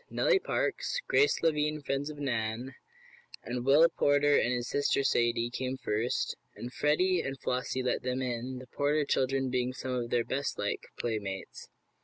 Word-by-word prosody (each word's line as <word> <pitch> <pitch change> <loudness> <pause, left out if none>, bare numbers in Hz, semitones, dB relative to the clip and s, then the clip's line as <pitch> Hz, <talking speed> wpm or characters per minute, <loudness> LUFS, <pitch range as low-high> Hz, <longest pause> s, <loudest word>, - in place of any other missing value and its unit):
Nellie 455 -6 +3
Parks, 460 - -1
Grace 430 - +3
Lavine 150 -1 +1
friends 140 +2 -2
of 150 - -8
Nan, 120 -2 -2 0.7
and 120 +1 -3
Willie 145 +5 +6
Porter 145 0 +3
and 120 - +3
his 120 -1 -1
sister 140 -1 +1
Sadie, 120 -2 +1
came 130 +1 -3
first, 110 +1 -1 0.2
and 125 +2 -7
Freddie 175 +4 +2
and 135 -1 -5
Flossie 130 +1 -2
let 125 - 0
them 125 0 -2
in, 125 0 -3
the 130 - -9
Porter 145 +4 0
children 135 -1 +1
being 125 0 0
some 130 0 -5
of 120 -2 -2
their 120 -1 +1
bestliked 135 +3 -2
playmates. 100 -5 -4
130 Hz, 160 wpm, -30 LUFS, 120-145 Hz, 0.7 s, Willie